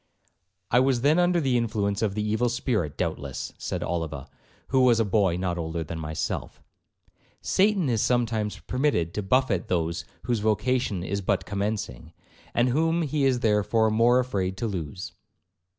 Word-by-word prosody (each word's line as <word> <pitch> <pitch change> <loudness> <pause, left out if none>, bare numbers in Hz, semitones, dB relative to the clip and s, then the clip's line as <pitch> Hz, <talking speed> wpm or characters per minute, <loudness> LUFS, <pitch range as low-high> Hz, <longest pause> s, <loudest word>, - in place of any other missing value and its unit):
'—'I 125 - +5
was 130 -2 +2
then 150 +6 +4
under 175 0 +3
the 135 -5 +1
influence 105 -3 -1
of 105 -3 0
the 105 - -1
evil 110 +3 +1
spirit 110 - -1
doubtless,' 70 -6 -3
said - - -3
Oliva, 80 -5 -3 0.4
who 130 -1 +3
was 120 -3 +5
a 115 - +3
boy 100 -4 +2
not 90 -1 -2
older 80 0 -3
than 80 +1 -6
myself; 80 0 -4 0.8
'Satan 195 -4 +2
is 115 -4 +1
sometimes 115 -4 0
permitted 125 - 0
to 105 - -2
buffet 105 -3 +1
those 85 -1 -1 0.2
whose 120 +1 0
vocation 110 -2 0
is 100 +2 -2
but 95 - 0
commencing, 100 - -3 0.4
and 120 +1 +3
whom 165 +5 +1
he 145 -1 0
is 130 -2 +2
therefore 110 +1 +2
more 115 +3 +4
afraid 100 -7 -1
to 115 - -2
lose.' 90 -4 -5
110 Hz, 160 wpm, -26 LUFS, 90-125 Hz, 0.8 s, I